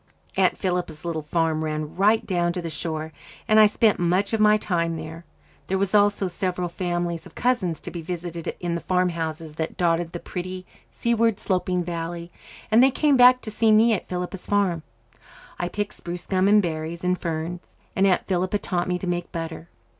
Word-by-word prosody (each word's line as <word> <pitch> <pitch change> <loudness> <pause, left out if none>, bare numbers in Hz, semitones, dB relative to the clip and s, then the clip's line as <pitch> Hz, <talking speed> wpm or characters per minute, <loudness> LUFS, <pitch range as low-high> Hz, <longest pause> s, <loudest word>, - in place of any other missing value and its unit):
Aunt - - +3
Philippa's 175 -4 -2
little 165 -2 -2
farm 160 +1 0
ran 155 -1 -3
right 210 +4 +3
down 175 -2 0
to 180 - -3
the 165 - -4
shore, 155 -1 -4 0.3
and 215 0 +5
I 215 - +9
spent 215 0 +2
much 180 +5 +1
of 225 - +1
my 215 0 +6
time 170 -5 -1
there. 160 +1 -8 0.4
There 190 - 0
were 195 - +2
also 205 -1 +4
several 180 0 -2
families 175 -1 -3
of - - -19
cousins 225 -10 0
to - - -7
be 170 - -5
visited 170 -1 -5
in 175 -1 -2
the 170 - -2
farmhouses 165 -3 -1
that 160 - -3
dotted 170 -1 +1
the 175 - -4
pretty, 185 +1 -6 0.2
seaward 230 -2 +1
sloping 180 -2 0
valley, 170 0 -5 0.4
and 225 +2 +6
they 265 - +7
came 290 +1 +2
back 250 0 +7
to 215 - -6
see 220 +1 +3
me 220 +2 +5
at 200 - -3
"Philippa's 180 +1 -5
Farm." 195 -5 +1 0.8
I 175 - -1
picked 205 +1 -3
spruce 175 0 -7
gum 190 0 +2
and 210 0 +5
berries 165 0 -4
and 180 0 +2
ferns, 170 +1 -5 0.2
and 195 +1 +4
Aunt 185 - +2
Philippa 185 +2 0
taught 180 -3 -2
me 180 0 0
to 180 - -6
make 175 -1 -2
butter. 165 0 -6
180 Hz, 190 wpm, -24 LUFS, 170-200 Hz, 0.8 s, I